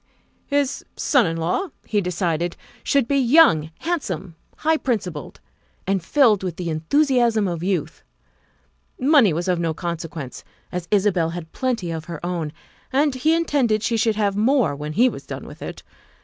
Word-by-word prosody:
His 285 -1 0
son 260 - +3
in 165 0 -2
law, 170 - -1 0.2
he 210 -2 +1
decided, 175 -2 -1 0.3
should 275 -4 +2
be 280 +1 +2
young, 245 - +5
handsome, 195 - -3 0.2
high 320 +1 +2
principled, 195 - -3 0.5
and 195 -2 0
filled 230 - +4
with 180 -3 -3
the 170 -2 -3
enthusiasm 235 - +2
of 170 -2 -3
youth; 185 0 -2 1.0
money 270 - +5
was 170 +4 -2
of 180 -2 +1
no 165 -2 -1
consequence, 165 -5 -5 0.3
as 180 -1 -4
Isabel 190 -5 +2
had 165 -1 -7
plenty 230 -10 -2
of 160 -1 -5
her 165 -2 -6
own, 170 -4 -2 0.4
and 285 +2 +2
he 310 +6 +2
intended 265 -10 +1
she 235 - +1
should 225 -1 +2
have 205 -2 +1
more 225 - +2
when 150 +1 -5
he 240 +9 +5
was - - -5
done - - -6
with - - -12
it. - - -7
195 Hz, 165 wpm, -22 LUFS, 170-255 Hz, 1.0 s, young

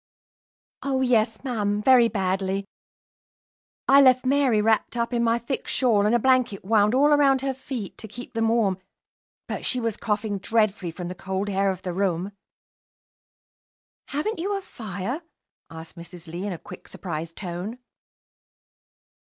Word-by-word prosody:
"Oh, 270 -1 0
yes, 225 -3 +2
ma'am, 210 -6 -1
very 245 +1 +6
badly. 195 -1 -1 1.2
I 275 +1 +7
left 255 -1 +5
Mary 265 -4 +3
wrapped 220 +3 +1
up 235 +1 -1
in 235 -1 +1
my 230 0 +3
thick 240 +3 -4
shawl, 215 -6 +2
and 225 - +3
a - - +3
blanket 250 -6 +2
wound 210 +2 +3
all 290 +3 +5
around 275 -2 +4
her 270 0 -1
feet 255 -5 -7
to 220 - -6
keep 240 +4 -10
them 225 -1 +1
warm; 220 -5 +2 0.7
but - - -4
she 255 - 0
was 230 -3 -2
coughing 210 -2 -2
dreadfully 215 -3 +1
from 175 +1 -6
the 180 - -4
cold 190 +2 -3
air 195 0 +2
of 190 -2 -4
the 180 - -3
room." 190 0 -1 1.8
"Haven't 325 +10 -2
you 400 +4 -1
a - - -5
fire?" 220 - -5 0.5
asked 160 +1 -10
Mrs. 170 0 -10
Lee, 175 +4 -5
in 200 - -2
a - - -6
quick, - - -12
surprised 165 -2 -6
tone. 185 +5 -5
220 Hz, 155 wpm, -25 LUFS, 190-255 Hz, 1.8 s, I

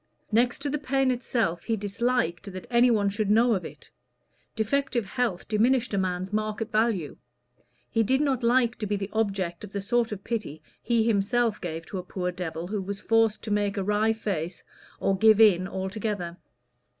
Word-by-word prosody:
Next 240 +4 +2
to 290 - -1
the 300 - -1
pain 270 -1 +1
itself 235 -8 -1
he 225 - +1
disliked 205 -3 -1
that 185 - -7
any 240 +1 +5
one 210 -4 +2
should 205 +1 -2
know 230 +3 +4
of 190 - -1
it: - - -11 0.6
defective 240 +1 0
health 205 -3 -2
diminished 235 +2 +2
a - - +1
man's 185 +1 -2
market 215 +1 -2
value; 215 -8 0 0.7
he 225 - +1
did 260 +5 +2
not 275 -4 +1
like 240 0 +2
to 210 - -2
be 205 - 0
the 200 0 -4
object 195 -5 -1
of 205 - -9
the 200 - -2
sort 235 +2 +1
of 195 -2 -6
pity 200 -10 -4 0.2
he 235 -2 +2
himself 225 +1 +1
gave 165 -2 -5
to 190 - -5
a - - -6
poor 180 0 -3
devil 175 -2 -5
who 205 +2 -3
was 200 +1 -5
forced 225 0 +2
to 220 - -5
make 205 0 0
a 195 - 0
wry 210 +2 +2
face 190 -6 -3 0.4
or 195 - +1
"give 220 +2 +5
in" 190 -4 +5
altogether. 190 -2 -3
210 Hz, 185 wpm, -27 LUFS, 190-235 Hz, 0.7 s, any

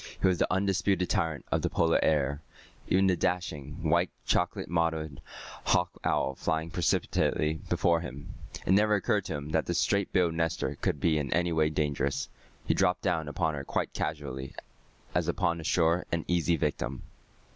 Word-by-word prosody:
He - - +1
was 90 -2 +2
the - - +1
undisputed 95 -1 +1
tyrant 80 -7 -1
of - - +2
the - - 0
Polar 80 0 +2
air, 70 -2 +1 0.5
even 95 +1 +3
the 95 -1 +4
dashing, 80 -5 -2
white - - +3 0.2
chocolate - - 0
mottled 80 -3 -1 0.4
hawk 90 0 +2
owl 70 - +1
flying 80 +4 -2
precipitately 80 -1 +1
before 85 -1 +3
him. 70 -2 -8 0.3
It - - +1
never 105 +2 +5
occurred 100 0 +1
to - - -3
him 70 0 -5
that 80 0 0
this 85 - 0
straight 100 +1 +1
billed 90 -4 +2
nester 80 0 -1
could 75 - 0
be 80 0 +2
in 70 -3 -3
any 85 0 +1
way 80 -1 +3
dangerous. 75 -2 -1 0.4
He - - +2
dropped 90 +1 +1
down 80 -3 0
upon 80 +2 -1
her 70 -2 -4
quite - - -2
casually, 70 -4 -4 0.6
as 85 -2 +1
upon 85 -1 0
a - - -8
sure 85 +1 +2
and 85 -1 -1
easy 85 -1 +2
victim. 65 -3 -2
80 Hz, 175 wpm, -29 LUFS, 75-90 Hz, 0.6 s, never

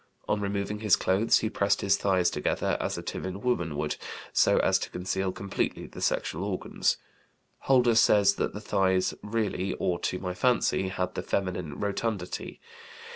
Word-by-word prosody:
On 105 - 0
removing 100 +1 -2
his 105 -3 +4
clothes 95 +5 +3
he 110 - 0
pressed 100 0 +1
his 100 0 +3
thighs 95 -3 +2
together, - - 0
as - - -2
a - - -5
timid 95 +3 -5
woman 85 -12 0
would, 75 0 -2 0.4
so - - +4
as - - +3
to - - -4
conceal 95 +1 -2
completely 100 +1 -3
the - - -10
sexual 85 +5 -1
organs; 100 -2 0 0.6
Holder 125 -3 +4
says 105 -3 +5
that - - -1
the 105 - -5
thighs 95 -3 +1
"really, 105 -3 -2
or 85 -1 -1
to 90 - -1
my 90 -1 -4
fancy," 120 -3 +2
had 90 -1 -2
the - - -3
feminine 90 -6 -3
rotundity. 100 -2 -3
100 Hz, 165 wpm, -28 LUFS, 90-105 Hz, 0.6 s, says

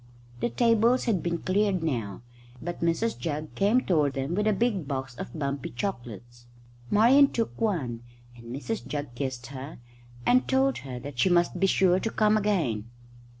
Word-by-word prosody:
The 235 - 0
tables 235 +1 +3
had 210 -8 +1
been 170 0 -1
cleared 190 -2 +1
now, 115 -9 -3 0.4
but 175 +4 -6
Mrs 170 +7 0
Jugg 155 -2 -4
came 210 +6 +3
toward 150 - +1
them 135 +4 -3
with 210 +3 0
a - - +4
big 205 - 0
box 130 -2 -4
of 120 +3 -8
bumpy 140 -2 -3
chocolates. 120 - -6 0.4
Marian 255 +7 +6
took 230 -3 -3
one, 140 - -1 0.3
and 115 -1 -14
Mrs 140 - -5
Jugg 145 -4 -4
kissed 130 -1 -4
her 135 +4 -7 0.5
and 250 +1 +4
told 265 0 +2
her 130 -2 -7
that 130 0 -8
she 185 - +4
must 175 -1 +2
be 195 - +3
sure 185 -1 +3
to 225 - -2
come 215 -1 +2
again. 160 - 0
170 Hz, 170 wpm, -27 LUFS, 130-215 Hz, 0.5 s, Marian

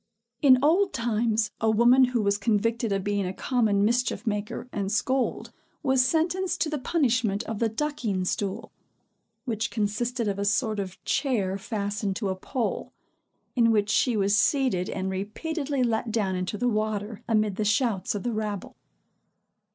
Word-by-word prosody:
In 265 -3 +7
old 370 +6 +3
times, 225 -3 0
a 220 - +3
woman 240 +4 +6
who 245 -3 -1
was 200 0 +1
convicted 230 +2 0
of 195 -1 0
being 205 -1 -1
a 185 - -5
common 215 -6 +1
mischief 240 -1 0
maker 215 +3 -3
and 200 -1 -2
scold, 260 +4 0 0.3
was 265 -3 +3
sentenced 335 +7 0
to 325 - +1
the 300 - -2
punishment 245 - +1
of 220 -2 -5
the 230 - +2
ducking 225 -7 -2
stool; 205 +4 -3 0.7
which 230 -2 -1
consisted 230 +3 -1
of 200 -1 -2
a - - 0
sort 215 0 +1
of 190 -2 -5
chair 235 -9 0
fastened 205 -1 -3
to 205 -2 -2
a 190 - -1
pole, 235 +5 -3 0.6
in 235 -2 +4
which 210 -2 +2
she 240 0 +2
was 200 0 +2
seated 215 -6 +2
and 190 0 -3
repeatedly 275 - -2
let 230 -1 0
down 205 -4 0
into 185 +3 -3
the 245 - 0
water, 215 -1 -2
amid 215 -3 +1
the 215 - 0
shouts 210 -2 +1
of 200 - -4
the 240 - -1
rabble. 210 -3 -4
220 Hz, 165 wpm, -26 LUFS, 205-250 Hz, 0.7 s, In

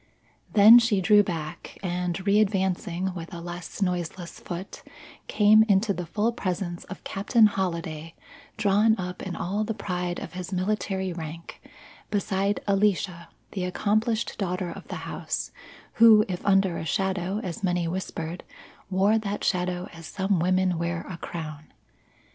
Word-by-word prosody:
Then 220 +3 +9
she 225 -4 +2
drew 205 +2 +6
back, 165 -6 -5
and 180 -1 -1
readvancing 190 -3 +1
with 170 -2 -7
a 170 - -7
less 175 +4 -5
noiseless 175 -1 -3
foot, 180 +2 -7 0.5
came 215 +1 +6
into 200 +1 +3
the 180 -2 -5
full 215 +6 0
presence 180 -5 -3
of 195 - -9
Captain 215 +4 +3
Holliday 170 -5 -2 0.4
drawn 215 +2 +3
up 180 -1 -5
in 185 -3 -5
all 200 +4 -1
the 220 0 -3
pride 180 -3 -3
of - - -8
his 185 +1 -6
military 190 -1 -1
rank 165 0 -8 0.5
beside 200 0 0
Alicia, 195 -3 +1 0.2
the 190 - -3
accomplished 215 +6 0
daughter 180 -2 -2
of - - -10
the - - -6
house, - - -4 0.5
who, 220 -2 +8
if 180 -2 -4
under 195 -3 +3
a - - -4
shadow 190 +1 -1
as 180 +1 -5
many 175 -2 +1
whispered, 170 -1 -4 0.5
wore 200 +4 +3
that 205 -1 -4
shadow 180 0 0
as 165 -2 -10
some 190 +1 0
women 185 0 +1
wear 170 0 -2
a 175 - -6
crown. 155 -3 -7
185 Hz, 145 wpm, -26 LUFS, 175-205 Hz, 0.5 s, Then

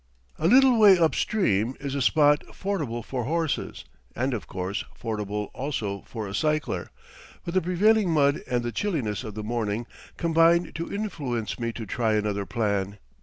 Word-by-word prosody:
A 160 - +2
little 255 +2 +6
way 200 -3 +8
up 165 -4 +3
stream 125 - +1
is 140 -1 -4
a 140 - -1
spot 145 +2 +4
fordable 145 - -3
for 125 -3 -3
horses, 165 +1 -2 0.3
and, 130 +3 -1
of 115 - -4
course, 95 +2 -3 0.2
fordable 105 -2 -3
also 110 -8 -3
for 110 -4 -5
a 95 - -7
cycler; 155 +6 -1 0.6
but 170 - -4
the 185 - +3
prevailing 200 +4 +3
mud 145 -3 +3
and 120 -1 0
the 120 - -2
chilliness 130 - -2
of 110 -3 -7
the 110 - -5
morning 110 0 -2 0.3
combine 170 +1 +3
to 165 +1 -5
influence 145 - -3
me 115 0 -1
to 115 - -6
try 110 +1 0
another 105 -2 -1
plan. 100 -3 -1
130 Hz, 170 wpm, -26 LUFS, 110-165 Hz, 0.6 s, way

